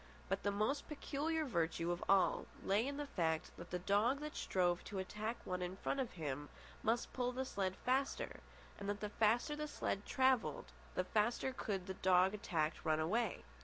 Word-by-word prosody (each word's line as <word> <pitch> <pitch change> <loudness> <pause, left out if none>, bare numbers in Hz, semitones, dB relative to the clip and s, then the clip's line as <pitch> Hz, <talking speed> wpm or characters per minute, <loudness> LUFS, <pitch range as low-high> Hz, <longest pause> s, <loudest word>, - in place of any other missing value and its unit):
But 195 +1 0
the 205 - +1
most 215 +8 0
peculiar 310 +2 -1
virtue 170 - 0
of 175 - -2
all 190 -3 +4 0.2
lay 210 +6 +2
in 280 0 -3
the 295 - -2
fact 160 - 0
that 170 - -9
the 180 - -1
dog 205 +9 +2
that 300 0 -5
strove 175 -2 +1
to 200 - -5
attack 210 +4 -3
one 180 0 -2
in 180 +1 -2
front 275 - -1
of 255 -3 -1
him 145 -3 -4 0.3
must 230 +2 +1
pull 250 -1 0
the 260 +1 -2
sled 190 -6 -1
faster, 265 +2 0 0.4
and 200 0 -3
that 205 0 -1
the 210 - -3
faster 225 +7 +2
the 300 0 -3
sled 200 -8 -2
travelled, 260 -4 +2 0.2
the 185 - +2
faster 230 +7 +1
could 195 -7 -2
the 190 - -3
dog 185 +1 +4
attacked 170 -8 -1
run 155 -1 +2
away. 210 +6 0
205 Hz, 190 wpm, -38 LUFS, 180-250 Hz, 0.4 s, all